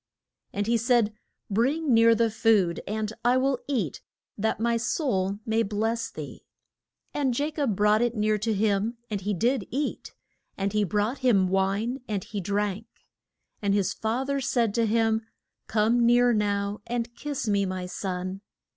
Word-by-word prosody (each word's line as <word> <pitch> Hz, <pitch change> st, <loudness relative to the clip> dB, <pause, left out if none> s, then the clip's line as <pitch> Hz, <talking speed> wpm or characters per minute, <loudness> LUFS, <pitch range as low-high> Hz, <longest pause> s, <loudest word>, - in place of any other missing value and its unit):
And 205 Hz, +1 st, -2 dB
he 235 Hz, +2 st, +2 dB
said, 230 Hz, -2 st, +2 dB, 0.3 s
Bring 265 Hz, +7 st, +1 dB
near 230 Hz, 0 st, +6 dB
the 230 Hz, 0 st, +2 dB
food, 210 Hz, -6 st, +2 dB
and 215 Hz, +1 st, -2 dB
I 245 Hz, +2 st, +4 dB
will 265 Hz, 0 st, +1 dB
eat, 225 Hz, -, -2 dB, 0.3 s
that 220 Hz, +1 st, -1 dB
my 235 Hz, +1 st, +1 dB
soul 200 Hz, -, 0 dB
may 225 Hz, 0 st, +1 dB
bless 225 Hz, +2 st, -1 dB
thee. -, -, -9 dB, 0.7 s
And 265 Hz, -5 st, 0 dB
Ja 295 Hz, +2 st, 0 dB
cob 280 Hz, -9 st, -1 dB
brought 210 Hz, +2 st, +3 dB
it 240 Hz, 0 st, +1 dB
near 215 Hz, 0 st, +1 dB
to 220 Hz, +2 st, -1 dB
him, 210 Hz, +2 st, +1 dB
and 205 Hz, -2 st, -2 dB
he 205 Hz, +1 st, -1 dB
did 245 Hz, +8 st, 0 dB
eat, 285 Hz, +3 st, -3 dB, 0.4 s
and 195 Hz, 0 st, -1 dB
he 210 Hz, 0 st, +2 dB
brought 210 Hz, -, 0 dB
him 210 Hz, -8 st, +3 dB
wine 195 Hz, +7 st, 0 dB
and 205 Hz, -4 st, -2 dB
he 205 Hz, -3 st, -5 dB
drank. 205 Hz, +3 st, -2 dB, 0.7 s
And 200 Hz, -1 st, +1 dB
his 200 Hz, -3 st, +1 dB
fa 225 Hz, +4 st, -1 dB
ther 280 Hz, 0 st, -1 dB
said 235 Hz, -4 st, +1 dB
to 230 Hz, 0 st, +2 dB
him, 225 Hz, 0 st, +2 dB, 0.5 s
Come 225 Hz, +2 st, +2 dB
near 240 Hz, +1 st, +5 dB
now, 205 Hz, -1 st, -1 dB
and 235 Hz, 0 st, -3 dB
kiss 285 Hz, -1 st, -4 dB
me, 200 Hz, -2 st, +2 dB
my 185 Hz, -1 st, -3 dB
son. 185 Hz, +1 st, -4 dB
220 Hz, 165 wpm, -26 LUFS, 200-240 Hz, 0.7 s, near